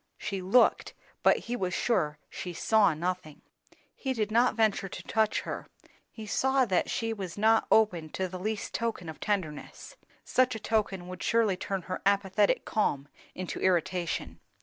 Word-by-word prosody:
She 200 Hz, -3 st, -4 dB
looked, 195 Hz, +7 st, +3 dB, 0.3 s
but -, -, +5 dB
he 240 Hz, -, -4 dB
was 185 Hz, -6 st, -2 dB
sure 155 Hz, -11 st, +1 dB
she 180 Hz, -, -6 dB
saw 200 Hz, -1 st, +3 dB
nothing. 175 Hz, -2 st, -4 dB, 0.5 s
He 265 Hz, -1 st, -3 dB
did 215 Hz, -3 st, -2 dB
not 235 Hz, +1 st, +3 dB
venture 215 Hz, -3 st, +1 dB
to -, -, -8 dB
touch 220 Hz, -1 st, +1 dB
her; -, -, -6 dB, 0.4 s
he 220 Hz, -, -9 dB
saw 265 Hz, +5 st, +2 dB
that 190 Hz, -5 st, +1 dB
she 225 Hz, -1 st, -1 dB
was 190 Hz, -4 st, -6 dB
not 220 Hz, +2 st, +3 dB
open 180 Hz, -8 st, +3 dB
to 190 Hz, -, -1 dB
the 185 Hz, 0 st, -7 dB
least 215 Hz, +2 st, -3 dB
token 225 Hz, -7 st, -2 dB
of 160 Hz, -, -9 dB
tenderness; 190 Hz, -, -4 dB, 0.3 s
such 255 Hz, -2 st, +2 dB
a -, -, -5 dB
token 200 Hz, -5 st, -1 dB
would 185 Hz, 0 st, -8 dB
surely 230 Hz, -4 st, +2 dB
turn 190 Hz, 0 st, -4 dB
her 185 Hz, +1 st, -5 dB
apathetic 200 Hz, 0 st, +2 dB
calm 145 Hz, -9 st, 0 dB, 0.3 s
into 185 Hz, -1 st, -5 dB
irritation. 180 Hz, -1 st, 0 dB
200 Hz, 165 wpm, -29 LUFS, 180-220 Hz, 0.5 s, but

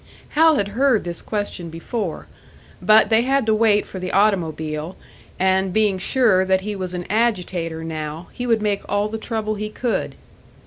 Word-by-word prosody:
Hal 320 Hz, +1 st, +5 dB
had 200 Hz, -7 st, 0 dB
heard 250 Hz, +1 st, +2 dB
this 175 Hz, -1 st, -6 dB
question 205 Hz, -5 st, -4 dB
before; 165 Hz, +3 st, -4 dB, 0.6 s
but 215 Hz, +1 st, +5 dB
they 220 Hz, +1 st, +5 dB
had 270 Hz, 0 st, +1 dB
to 220 Hz, -, +3 dB
wait 215 Hz, -1 st, +3 dB
for 190 Hz, -, -8 dB
the 185 Hz, 0 st, -4 dB
automobile 165 Hz, -5 st, 0 dB, 0.4 s
and 190 Hz, 0 st, +2 dB
being 205 Hz, -1 st, +1 dB
sure 200 Hz, -2 st, +3 dB
that 190 Hz, 0 st, +2 dB
he 210 Hz, +1 st, -4 dB
was 185 Hz, -2 st, -5 dB
an 175 Hz, 0 st, -4 dB
agitator 180 Hz, -7 st, -1 dB
now, 155 Hz, +1 st, -5 dB
he 245 Hz, -, -4 dB
would 225 Hz, -2 st, +2 dB
make 205 Hz, -1 st, 0 dB
all 205 Hz, +1 st, +1 dB
the 220 Hz, +1 st, -4 dB
trouble 220 Hz, -1 st, -2 dB
he 210 Hz, 0 st, -4 dB
could! 235 Hz, +2 st, -2 dB
205 Hz, 175 wpm, -21 LUFS, 180-220 Hz, 0.6 s, Hal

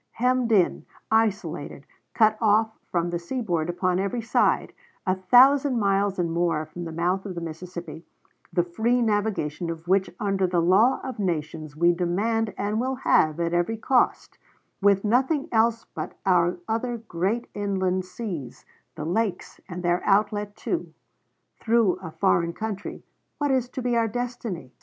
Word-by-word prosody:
Hemmed 250 Hz, 0 st, +1 dB
in, 195 Hz, -5 st, +2 dB, 0.2 s
isolated, 195 Hz, -10 st, 0 dB, 0.3 s
cut 220 Hz, -2 st, +4 dB
off 220 Hz, 0 st, +3 dB, 0.2 s
from 175 Hz, -1 st, -1 dB
the 175 Hz, -, -2 dB
seaboard 175 Hz, -5 st, -2 dB
upon 180 Hz, +1 st, 0 dB
every 200 Hz, +5 st, -1 dB
side; 225 Hz, -, +1 dB, 0.3 s
a 185 Hz, -, +2 dB
thousand 255 Hz, +7 st, +5 dB
miles 200 Hz, -1 st, +1 dB
and 170 Hz, -2 st, -1 dB
more 165 Hz, -2 st, 0 dB
from 170 Hz, +3 st, -8 dB
the 165 Hz, -, -6 dB
mouth 175 Hz, +4 st, 0 dB
of 190 Hz, -3 st, -6 dB
the -, -, -3 dB
Mississippi, 165 Hz, -1 st, -7 dB, 0.5 s
the 175 Hz, -, +2 dB
free 220 Hz, +8 st, 0 dB
navigation 205 Hz, -7 st, -1 dB
of 165 Hz, 0 st, -6 dB
which 190 Hz, +1 st, +2 dB
under 195 Hz, -2 st, +1 dB
the 175 Hz, -1 st, +1 dB
law 195 Hz, +10 st, +4 dB
of 260 Hz, -4 st, -6 dB
nations 155 Hz, -5 st, -3 dB
we 170 Hz, +2 st, +4 dB
demand 205 Hz, +6 st, 0 dB
and 210 Hz, +2 st, -1 dB
will 260 Hz, +1 st, -1 dB
have 155 Hz, -, +2 dB
at 170 Hz, 0 st, -1 dB
every 175 Hz, +6 st, 0 dB
cost; 250 Hz, +3 st, +1 dB, 0.4 s
with 200 Hz, 0 st, +3 dB
nothing 265 Hz, +7 st, +2 dB
else 230 Hz, 0 st, +2 dB
but -, -, -6 dB
our 180 Hz, -2 st, +3 dB
other 235 Hz, +2 st, -1 dB
great 220 Hz, +2 st, -2 dB
inland 190 Hz, -2 st, -1 dB
seas, 180 Hz, -, -7 dB, 0.3 s
the 150 Hz, -, -5 dB
lakes, 200 Hz, +4 st, -2 dB
and 180 Hz, 0 st, -6 dB
their 175 Hz, 0 st, +1 dB
outlet, 205 Hz, 0 st, +1 dB
too, 340 Hz, -, -4 dB, 0.6 s
through 225 Hz, -4 st, +2 dB
a -, -, -6 dB
foreign 170 Hz, -1 st, +1 dB
country 215 Hz, 0 st, -5 dB, 0.3 s
what 290 Hz, -2 st, 0 dB
is 255 Hz, -2 st, +1 dB
to 255 Hz, 0 st, -6 dB
be 245 Hz, -1 st, +1 dB
our 230 Hz, -1 st, +2 dB
destiny? 230 Hz, -, -5 dB
195 Hz, 155 wpm, -25 LUFS, 175-225 Hz, 0.6 s, thousand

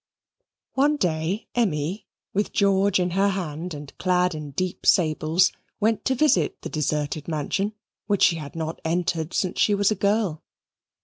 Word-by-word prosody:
One 290 Hz, +3 st, +3 dB
day 175 Hz, -, -1 dB
Emmy, 190 Hz, -2 st, -1 dB, 0.3 s
with 205 Hz, +1 st, 0 dB
George 200 Hz, -1 st, +3 dB
in 180 Hz, -1 st, 0 dB
her 195 Hz, +3 st, +2 dB
hand 175 Hz, -3 st, -4 dB
and 145 Hz, -1 st, -10 dB
clad 180 Hz, -1 st, +2 dB
in 150 Hz, -2 st, -6 dB
deep 180 Hz, +6 st, -3 dB
sables, 160 Hz, +1 st, +3 dB, 0.3 s
went 220 Hz, +1 st, +1 dB
to 265 Hz, -, +2 dB
visit 240 Hz, -, +2 dB
the -, -, -4 dB
deserted 150 Hz, -1 st, -2 dB
mansion 170 Hz, +6 st, -1 dB, 0.3 s
which 205 Hz, -1 st, +2 dB
she 165 Hz, -, +5 dB
had 150 Hz, -1 st, -8 dB
not 160 Hz, 0 st, -4 dB
entered 165 Hz, -1 st, -1 dB
since 185 Hz, -2 st, -1 dB
she 205 Hz, -, +4 dB
was 200 Hz, +1 st, +2 dB
a -, -, +1 dB
girl. 200 Hz, -5 st, 0 dB
180 Hz, 160 wpm, -24 LUFS, 155-200 Hz, 0.3 s, she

